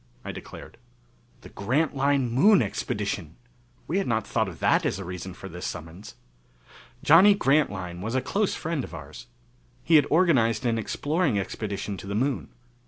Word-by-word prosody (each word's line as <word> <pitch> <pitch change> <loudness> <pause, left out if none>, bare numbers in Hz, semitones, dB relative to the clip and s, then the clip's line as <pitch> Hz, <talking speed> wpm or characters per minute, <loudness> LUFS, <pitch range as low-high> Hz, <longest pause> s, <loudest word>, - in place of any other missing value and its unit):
I - - -4
declared. - - -11 0.6
The - - -12
Grantline 135 +2 0
Moon 150 - +5
Expedition! 100 -4 -3 0.5
We 180 +5 0
had 195 - -2
not 110 -1 0
thought 110 -3 0
of 85 - -10
that - - +2
as - - -1
a 95 - -7
reason 90 +1 -7
for 95 - -9
this 90 0 -9
summons. 85 +6 -8 0.9
Johnny 190 +6 +7
Grantline 100 - 0
was 110 +5 -3
a - - +3
close 200 +8 0
friend 160 -4 -3
of 90 - -8
ours. 75 -1 -10 0.6
He 165 -1 +5
had 145 - +3
organized 130 - +3
an 115 -1 +1
exploring 145 - 0
expedition 100 0 -4
to 95 - -9
the 100 - -3
Moon. 130 +4 -1
115 Hz, 165 wpm, -26 LUFS, 95-150 Hz, 0.9 s, Johnny